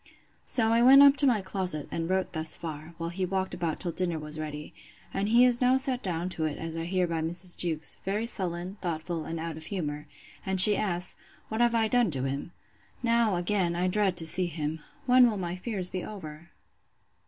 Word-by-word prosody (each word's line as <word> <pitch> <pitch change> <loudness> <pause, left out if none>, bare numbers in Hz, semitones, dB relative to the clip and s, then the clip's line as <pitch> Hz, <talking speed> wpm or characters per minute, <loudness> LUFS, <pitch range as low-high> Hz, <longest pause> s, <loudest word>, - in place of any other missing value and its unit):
So 225 -3 +1
I 230 +1 +3
went 270 +3 +8
up 280 0 +7
to 280 - +5
my 220 -6 +2
closet; 185 -6 -1
and 165 0 -3
wrote 190 0 -1
thus 160 -1 0
far, 160 0 -8
while 170 0 -4
he 185 +2 -4
walked 190 +1 -2
about 170 -3 -3
till 175 - 0
dinner 175 -1 -1
was 150 0 -6
ready; 150 -1 -7 0.4
and 200 +2 -1
he 240 +2 +6
is 245 -1 +2
now 255 +1 +4
sat 260 -2 -1
down 175 -3 -2
to 165 -3 -3
it, 150 -2 -3
as 165 0 -6
I 165 0 -4
hear 185 +1 0
by 165 -2 -2
Mrs. 175 +3 -2
Jewkes, 160 -2 +1
very 205 +4 -2
sullen, 185 -3 -4
thoughtful, 165 -1 -4
and 165 0 -5
out 165 -1 -5
of 160 - -7
humour; 150 -6 -4 0.4
and 190 -1 -1
she 205 +3 +9
asks, 180 -4 0 0.3
What 220 +2 -2
I 240 - +6
have 230 -2 0
done 245 -4 +3
to 135 -5 -2
him?—Now, 205 - -2
again, 175 -1 0
I 180 +1 0
dread 190 -1 0
to 165 - +2
see 180 +3 +4
him!—When 170 - +1
will 215 - -3
my 175 -2 -4
fears 185 -2 -3
be 185 - -4
over? 170 -5 -9
180 Hz, 210 wpm, -28 LUFS, 165-210 Hz, 0.4 s, she